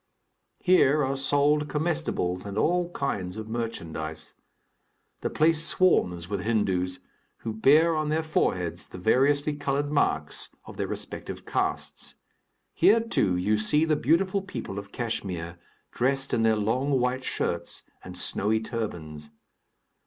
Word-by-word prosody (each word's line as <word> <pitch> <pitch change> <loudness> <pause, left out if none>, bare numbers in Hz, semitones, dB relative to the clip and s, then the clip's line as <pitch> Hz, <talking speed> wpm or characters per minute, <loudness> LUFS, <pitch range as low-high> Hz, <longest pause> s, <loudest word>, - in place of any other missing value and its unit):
Here 155 -6 +4
are 135 +1 -1
sold 145 +2 +2
comestibles 150 - -1
and 100 0 -6
all 175 +7 +2
kinds 100 - -3
of 110 0 -6
merchandise. 80 -9 -5 0.9
The - - -1
place 160 0 +2
swarms 90 - +2
with 100 +1 -2
Hindus, 95 -4 0 0.4
who 110 - -4
bear 155 +9 +5
on 155 -1 -1
their 160 +1 +1
foreheads 90 - -1
the - - -10
variously 140 +9 +2
colored 145 0 -1
marks 150 - 0 0.2
of - - -11
their - - -1
respective - - -6
castes. - - -3 0.6
Here, 200 +7 +5
too, 225 - +1
you 105 +4 +1
see 150 +8 +3
the 155 -1 +2
beautiful 185 - +2
people 120 - -6
of 100 0 -11
Kachmyr, 90 -8 -4 0.3
dressed 135 +2 0
in 115 - +2
their 110 -1 +4
long 125 +6 +1
white 125 +1 0
shirts 85 -8 -3 0.2
and - - -9
snowy 110 +2 0
turbans. 85 -10 -5
125 Hz, 135 wpm, -27 LUFS, 95-150 Hz, 0.9 s, bear